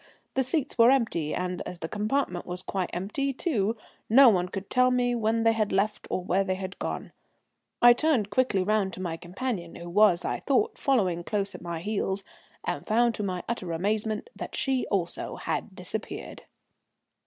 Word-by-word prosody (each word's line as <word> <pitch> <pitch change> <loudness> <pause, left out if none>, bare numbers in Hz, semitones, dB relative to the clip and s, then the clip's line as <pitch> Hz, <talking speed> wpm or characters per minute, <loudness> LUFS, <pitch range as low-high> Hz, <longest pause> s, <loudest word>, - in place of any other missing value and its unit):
The 265 - +2
seats 260 0 -1
were 230 +1 +8
empty, 225 - +1
and 180 0 -2
as 180 - -7
the 160 - -5
compartment 210 -2 -1
was 180 +1 -5
quite 190 -2 -2
empty, 210 +10 -2
too, 230 - 0 0.3
no 260 +3 +8
one 180 -4 +2
could 195 +1 -5
tell 255 0 +4
me 245 -1 +2
when 225 -1 +1
they 225 - +5
had 215 -2 0
left 205 +2 0
or 185 - -1
where 190 +2 +2
they 190 -1 -1
had 185 0 -6
gone. - - -4 0.7
I 240 0 +10
turned 240 -7 +1
quickly 215 -5 +2
round 200 -1 +1
to - - -8
my 175 -3 -3
companion, 180 +1 -4
who 170 0 -8
was, 200 -3 +4
I - - -1
thought, 420 - +1
following 190 -11 +1
close 200 +1 -2
at - - -9
my 170 -2 -4
heels, 195 0 -1 0.4
and - - -3
found 235 +2 +3
to 210 - -5
my 185 -3 -2
utter 205 -7 -3
amazement 215 - -1
that - - -6
she 265 -2 0
also 175 -4 -2
had - - -3
disappeared. - - -5
210 Hz, 185 wpm, -27 LUFS, 180-240 Hz, 0.7 s, I